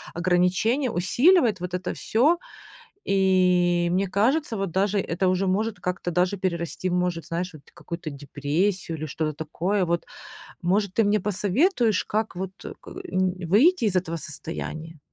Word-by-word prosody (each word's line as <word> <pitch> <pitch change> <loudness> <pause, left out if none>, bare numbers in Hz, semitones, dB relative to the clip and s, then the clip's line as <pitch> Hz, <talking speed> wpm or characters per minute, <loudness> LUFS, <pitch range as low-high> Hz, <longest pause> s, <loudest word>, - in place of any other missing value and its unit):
ограничение 185 - +2
усиливает, 235 - +3
вот 180 0 -5
это 185 - -3
всё. 285 +10 +2 0.7
И, 180 -2 +3
мне 195 +2 +1
кажется, 235 - +1
вот 195 -2 -2
даже 200 +2 +1
это 185 0 -1
уже 185 +1 +1
может 210 +3 0
как-то 180 -1 -3
даже 180 +3 +1
перерасти 175 -1 -2
в 175 - -1
может, 180 -2 -1
знаешь, 175 +1 -3
вроде 150 - -14
какую-то 170 -2 -6
депрессию 150 +6 -2
или 155 - -4
что-то 155 +1 -2
такое 175 +6 -1
вот. 170 0 -1 0.6
Может, 195 +2 +1
ты 225 - +3
мне 210 +1 +3
посоветуешь, 210 - +1
как 215 -3 -2
вот, 190 +1 -4
э, - - -6
к - - -12
м, 185 - -1
выйти 245 - +4
из 200 - +1
этого 170 -2 0
состояния? 160 +1 -5
185 Hz, 155 wpm, -25 LUFS, 170-210 Hz, 0.7 s, выйти